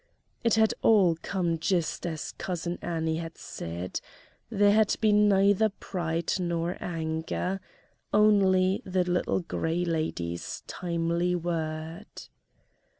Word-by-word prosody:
It 230 -1 +3
had 220 0 +4
all 190 -7 +5
come 175 -4 -1
just 170 0 0
as 160 -3 -4
Cousin 175 -1 -3
Annie 160 -1 -1
had 165 0 -6
said; 85 +2 -5 0.5
there 205 -2 +4
had 215 0 +4
been 210 -1 +4
neither 200 +2 +4
pride 170 -4 -3
nor 170 0 -1
anger. 165 +3 -2 0.5
Only 195 -3 +4
the 185 -1 0
Little 180 +1 0
Gray 170 0 -1
Lady's 120 - -3
timely 170 0 -1
word. 160 -1 -3
175 Hz, 110 wpm, -28 LUFS, 165-195 Hz, 0.5 s, all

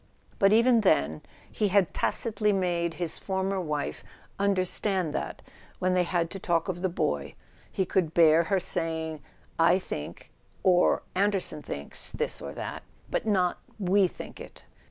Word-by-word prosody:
But 195 0 +5
even 230 +1 +5
then 75 - +2 0.3
he 210 - +1
had 195 -3 +2
tacitly 210 -2 0
made 175 -3 0
his 175 -2 -3
former 190 0 -1
wife 150 -4 -3 0.4
understand 190 -3 +1
that, - - -4 0.3
when 185 0 +1
they 180 -1 +3
had 170 -1 0
to 195 - -5
talk 170 -3 0
of 175 -2 -3
the 185 - +1
boy, 75 - -2 0.4
he 190 - 0
could 170 -3 0
bear 165 0 +6
her 195 +3 +1
saying 160 -3 -3 0.4
"I 170 +2 +5
think," 75 - -7 0.3
or 180 -1 +4
"Anderson 195 -5 0
thinks," 70 - -4
this - - -2
or - - -6
that, - - -5 0.3
but - - -1
not 185 -4 +2 0.2
"we 195 -1 +3
think - - -10
it." - - -12
180 Hz, 155 wpm, -28 LUFS, 165-195 Hz, 0.4 s, bear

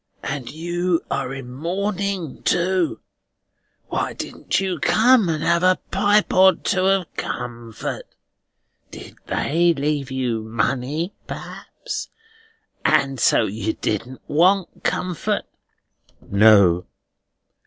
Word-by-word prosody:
And 140 -4 -4
you 175 +2 -1
are 125 - -1
in 135 -2 -7
mourning 190 +2 -3
too! 180 0 +1 0.9
Why - - -2
didn't - - -3
you 190 -3 -2
come 225 - +4
and 155 -1 -1
have 170 0 +2
a 185 0 +4
pipe 205 +1 +2
or 190 0 +6
two 185 0 0
of 195 -3 +1
comfort? 120 -2 -5 0.8
Did - - -11
they 170 +3 +2
leave 145 -1 -1
you 125 -4 -1
money, 130 - -2
perhaps, - - -7 0.7
and 140 -4 +2
so - - +4
you 110 +1 -2
didn't 120 +5 -4
want 185 +5 +2
comfort?" 180 -3 -1 0.8
"No." 100 -4 +4
160 Hz, 105 wpm, -22 LUFS, 125-185 Hz, 0.9 s, or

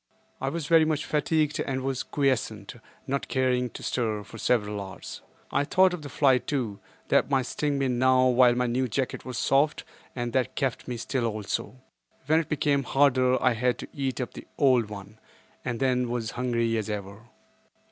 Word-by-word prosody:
I 135 - 0
was 160 +1 -4
very 165 +1 +5
much 155 -1 0
fatigued 150 0 0
and 130 -1 -2
was 135 -1 -1
quiescent, 120 -7 -1 0.3
not 140 +1 -2
caring 125 -1 +1
to - - -10
stir, 110 -4 -1
for 115 - -11
several 105 -4 0
hours. 95 -1 -8 0.3
I - - +2
thought 185 +5 +4
of 180 - -5
the 145 - -8
fly 135 -1 +3
too, 120 -9 -3 0.3
that - - +3
might 135 -3 +2
sting 145 +3 -1
me 135 -1 +1
now 130 +1 +3
while 125 -1 +5
my 125 0 +1
new 125 +2 0
jacket 130 +3 -3
was 125 -2 -5
soft, 140 +5 +2 0.3
and 120 -2 -3
that 130 -2 0
kept 135 -5 -2
me 125 -1 -3
still 120 0 -1
also. 110 +2 -3 0.5
When 155 +3 +4
it 160 - -4
became 145 -1 +1
harder 130 -2 +3
I 125 - +4
had 120 +1 0
to - - -7
eat 135 -3 -2
up 125 - -4
the - - -10
old 125 -6 +3
one, 105 +1 -10 0.4
and 120 -2 -3
then 125 -2 +1
was 120 -2 -2
hungry 115 -2 0
as 110 - -4
ever. 105 +2 -6
125 Hz, 190 wpm, -27 LUFS, 115-140 Hz, 0.5 s, very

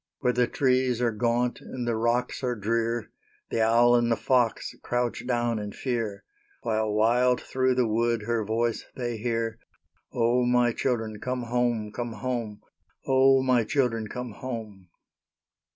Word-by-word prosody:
Where 125 - +2
the 125 0 +2
trees 130 -2 +1
are 120 -1 +2
gaunt 120 +2 0
and 125 -2 -6
the 120 - +1
rocks 120 +4 0
are 125 -1 0
drear, 115 +2 -1 0.4
The 115 - +1
owl 120 +2 +5
and 120 -1 +2
the - - +4
fox 125 -3 +1
crouch 120 0 -2
down 120 -2 0
in 105 -1 -6
fear, 115 -6 -3 0.4
While 110 -1 0
wild 120 +4 +3
through 130 -1 0
the 125 -1 +2
wood 115 0 0
her 115 0 0
voice 115 +2 -1
they 120 -2 -3
hear, 115 0 -2 0.5
"O, 120 +1 +2
my 120 -1 +3
children, 110 -5 -2
come 125 +1 -3
home, 120 -3 0
come 120 +1 -4
home! 115 -2 -4 0.4
O, 135 0 +4
my 125 -3 +3
children, 115 -4 0
come 125 +2 -6
home!" 105 -5 -7
120 Hz, 150 wpm, -27 LUFS, 115-125 Hz, 0.5 s, owl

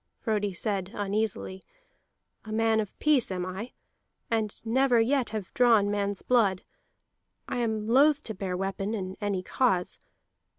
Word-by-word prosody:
Frodi 210 -3 -1
said 190 0 -2
uneasily: 205 -2 -2 0.8
"A 215 - -9
man 225 0 +2
of 210 -3 -4
peace 290 -9 +2
am 180 -1 -2
I, 190 +6 -6 0.6
and 220 -2 -1
never 245 +1 +3
yet 255 +2 +2
have 215 -4 -5
drawn 230 -6 +4
man's 200 -1 -2
blood. 210 -7 +2 0.8
I - - -3
am 220 -2 -1
loth 285 +5 +4
to 220 - -5
bare 185 -2 -3
weapon 195 +3 -2
in 190 -2 -4
any 200 -3 -1
cause. 185 -6 0
215 Hz, 140 wpm, -28 LUFS, 195-230 Hz, 0.8 s, drawn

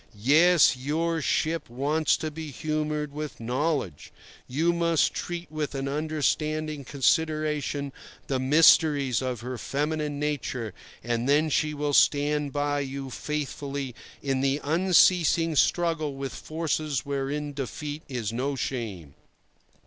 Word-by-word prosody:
Yes, 150 +9 +5
your 160 +5 -1
ship 160 +1 0
wants 145 +6 +1
to 155 - -4
be 160 0 -7
humoured 150 0 -2
with 150 -1 -6
knowledge. 125 - -2 0.4
You 160 +7 +1
must 170 -3 +2
treat 175 -1 -5
with 155 -2 -3
an 135 0 -2
understanding 155 0 -1
consideration 150 0 0 0.3
the 135 -2 -1
mysteries 145 -2 +5
of 125 -3 -3
her 125 0 -5
feminine 150 0 -2
nature, 130 -7 -3 0.3
and 120 +2 -1
then 150 +2 +3
she 150 +2 +1
will 145 0 -1
stand 145 0 +3
by 145 0 0
you 135 -1 -5
faithfully 140 -2 -4 0.3
in 135 -2 0
the 135 +1 +1
unceasing 170 0 +3
struggle 160 -2 +1
with 135 0 -5
forces 155 -3 -2
wherein 140 +1 -3
defeat 145 +2 -5
is 115 -5 -3
no 135 +4 -1
shame. 105 - -4
145 Hz, 125 wpm, -27 LUFS, 135-155 Hz, 0.4 s, Yes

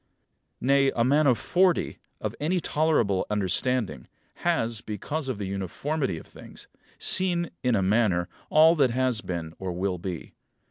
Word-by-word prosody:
Nay, 135 +1 +3
a 115 - +2
man 145 +4 +3
of 125 -3 +4
forty, 180 - +1 0.2
of - - -3
any 175 +5 0
tolerable 150 - +1
understanding, 105 - 0 0.3
has, 115 -1 0
because 135 +8 -4
of 125 - -2
the 100 - -4
uniformity 100 - -3
of - - -10
things, - - -12 0.3
seen, 175 -2 +2
in 125 -2 +2
a 100 - +1
manner, 95 -3 +2 0.2
all 160 +2 +6
that 135 -4 +4
has 125 -2 0
been 85 -3 -5
or 95 -1 -4
will 90 0 -2
be. 90 -2 -6
120 Hz, 150 wpm, -26 LUFS, 95-150 Hz, 0.3 s, all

